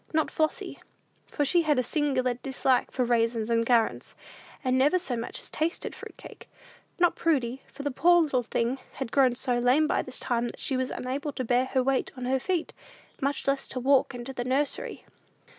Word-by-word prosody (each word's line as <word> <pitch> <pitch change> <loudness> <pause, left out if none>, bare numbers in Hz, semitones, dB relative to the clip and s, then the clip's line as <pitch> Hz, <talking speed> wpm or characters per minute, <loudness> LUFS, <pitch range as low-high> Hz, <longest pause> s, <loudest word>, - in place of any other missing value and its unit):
Not 315 - +2
Flossy, 310 -1 -2 0.5
for 290 - -1
she 345 +5 +3
had 305 -4 +2
a 255 - +2
singular 260 -3 0
dislike 260 +1 0
for 255 - -1
raisins 230 -1 +1
and 230 0 +2
currants, 235 -3 +1 0.5
and 255 -1 +1
never 285 +7 +4
so 340 -9 -2
much 230 0 -4
as - - -7
tasted 325 +3 -2
fruit - - -11
cake. - - -13 0.5
Not 350 -2 +3
Prudy, 265 -5 0
for 280 - -8
the 285 - -1
poor 345 +5 +5
little 275 -5 +1
thing 240 +2 -1
had 260 -3 -5
grown 260 -3 +4
so 245 -1 -1
lame 255 +6 +4
by - - +1
this 255 - -4
time, 240 -1 0
that - - -9
she 270 - -2
was 255 0 -1
unable 275 +4 -3
to 255 - -3
bear 245 +2 +2
her 260 0 0
weight 270 0 +1
on 250 - -5
her 260 +1 +1
feet, 350 +4 -2 0.5
much 280 +1 -1
less 275 0 0
to 255 - -5
walk 265 0 +3
into 245 +2 -6
the 245 - -3
nursery. 270 +3 -2
260 Hz, 200 wpm, -27 LUFS, 245-285 Hz, 0.5 s, poor